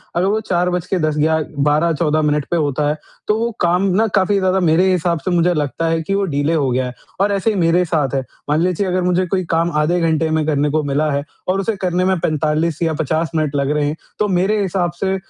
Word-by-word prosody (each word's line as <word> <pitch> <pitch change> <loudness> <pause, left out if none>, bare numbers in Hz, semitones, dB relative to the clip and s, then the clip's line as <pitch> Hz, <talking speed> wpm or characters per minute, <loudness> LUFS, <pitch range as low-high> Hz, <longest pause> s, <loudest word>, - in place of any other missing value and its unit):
अगर 175 - +2
वो 210 +3 +1
4 180 0 +1
बज 180 -1 -2
के 190 - 0
10 155 - -1
ग्या 160 +1 +2 0.3
12-14 155 0 +1
मिनट 150 -1 0
पे 175 - +2
होता 145 -1 0
है, 150 - -1 0.3
तो 210 +1 +2
वो 235 - 0
काम 175 +2 +2
ना 225 +2 +3
काफ़ी 195 +1 +2
ज़्यादा 190 0 +1
मेरे 175 +2 +3
हिसाब 175 -2 0
से 185 - 0
मुझे 175 0 +2
लगता 150 +2 -2
है 165 0 0
कि 195 - -3
वो 200 - +1
डिले 145 +3 +1
हो 145 -4 +1
गया 130 +1 0
है 125 - -5 0.3
और 205 +1 +2
ऐसे 200 +2 0
ही 215 - -1
मेरे 170 +2 +3
साथ 155 -5 -1
है। 135 - +1 0.3
मान 150 +2 +2
लीजिए 185 +2 0
अगर 185 0 0
मुझे 180 +1 +1
कोई 185 +1 -1
काम 165 +1 +1
आधे 175 +4 +1
घंटे 160 -1 +1
में 155 -1 0
करने 150 -1 +1
को 155 +1 0
मिला 145 +2 0
है 140 0 -1 0.2
और 185 +1 +1
उसे 220 +2 -1
करने 180 0 0
में 190 -1 +2
45 155 +1 0
या 165 -1 +1
50 160 +2 -1
मिनट 155 -2 0
लग 140 0 0
रहे 150 -1 +1
हैं, 150 +2 -1 0.2
तो 210 - +2
मेरे 195 +3 +1
हिसाब 185 -2 -1
से 190 0 +1
165 Hz, 250 wpm, -18 LUFS, 150-185 Hz, 0.3 s, ना